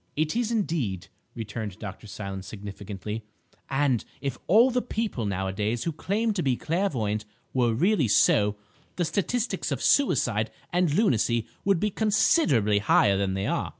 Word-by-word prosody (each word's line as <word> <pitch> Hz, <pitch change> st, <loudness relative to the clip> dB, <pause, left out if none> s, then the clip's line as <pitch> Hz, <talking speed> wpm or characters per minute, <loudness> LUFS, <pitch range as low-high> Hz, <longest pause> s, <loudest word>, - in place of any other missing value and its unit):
"It 155 Hz, +4 st, 0 dB
is 235 Hz, -1 st, 0 dB
indeed," 155 Hz, -, -1 dB, 0.3 s
returned 110 Hz, -3 st, -5 dB
John 100 Hz, -4 st, -5 dB
Silence 100 Hz, -2 st, -6 dB
significantly, 105 Hz, +1 st, -6 dB, 0.5 s
"and 135 Hz, -4 st, +1 dB, 0.2 s
if 135 Hz, -3 st, -4 dB
all 230 Hz, +8 st, +6 dB
the 250 Hz, 0 st, +1 dB
people 215 Hz, -, -2 dB
nowadays 100 Hz, +4 st, -2 dB
who 165 Hz, -, -1 dB
claim 210 Hz, +8 st, -1 dB
to 195 Hz, -, -1 dB
be 130 Hz, -5 st, +1 dB
clairvoyant 125 Hz, -, -1 dB, 0.3 s
were 120 Hz, -3 st, +2 dB
really 175 Hz, -, +2 dB
so, 105 Hz, 0 st, +4 dB, 0.4 s
the 175 Hz, -, 0 dB
statistics 210 Hz, +8 st, -1 dB
of -, -, -1 dB
suicide 115 Hz, -, +2 dB, 0.2 s
and 175 Hz, -3 st, +2 dB
lunacy 120 Hz, -, +2 dB, 0.2 s
would 195 Hz, -3 st, +2 dB
be 210 Hz, +3 st, 0 dB
considerably 170 Hz, -, +3 dB
higher 100 Hz, -1 st, +4 dB
than 95 Hz, -1 st, 0 dB
they 95 Hz, +1 st, -2 dB
are. -, -, -1 dB
125 Hz, 150 wpm, -26 LUFS, -, 0.5 s, all